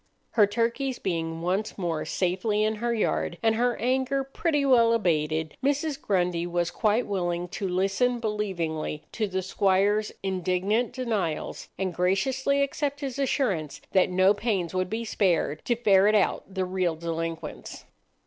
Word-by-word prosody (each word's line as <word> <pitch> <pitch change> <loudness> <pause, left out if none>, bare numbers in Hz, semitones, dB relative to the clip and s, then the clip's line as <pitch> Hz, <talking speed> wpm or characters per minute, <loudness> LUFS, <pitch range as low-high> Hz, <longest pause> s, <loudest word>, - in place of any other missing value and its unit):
Her 210 -3 +5
turkeys 235 +5 -1
being 165 -2 -3
once 190 +5 -1
more 170 -5 -2
safely 195 +4 0
in 215 0 0
her 235 +2 -1
yard, 80 - 0
and 225 -1 +4
her 240 +1 +1
anger 260 +3 0
pretty 290 +2 0
well 235 -4 +5
abated, 160 -6 0
Mrs. 285 +1 0
Grundy 175 -3 0
was 175 -1 -1
quite 220 +2 +1
willing 175 -3 -2
to 195 +1 -3
listen 195 +7 +1
believingly 180 -9 -2
to 215 -2 -1
the 190 -1 -2
squire's 200 +3 +2
indignant 190 +5 0
denials, 220 - -2
and 185 -1 -2
graciously 260 +11 +1
accept 285 +1 -2
his 275 -1 -4
assurance 200 - 0
that 190 -1 +4
no 185 +2 +4
pains 200 -5 -1
would 185 0 -1
be 230 +2 -3
spared 175 -8 0
to 240 - +2
ferret 210 -2 +4
out 200 -1 +1
the 190 -1 -1
real 180 -2 0
delinquents. 165 0 -5
195 Hz, 150 wpm, -26 LUFS, 175-235 Hz, -, Her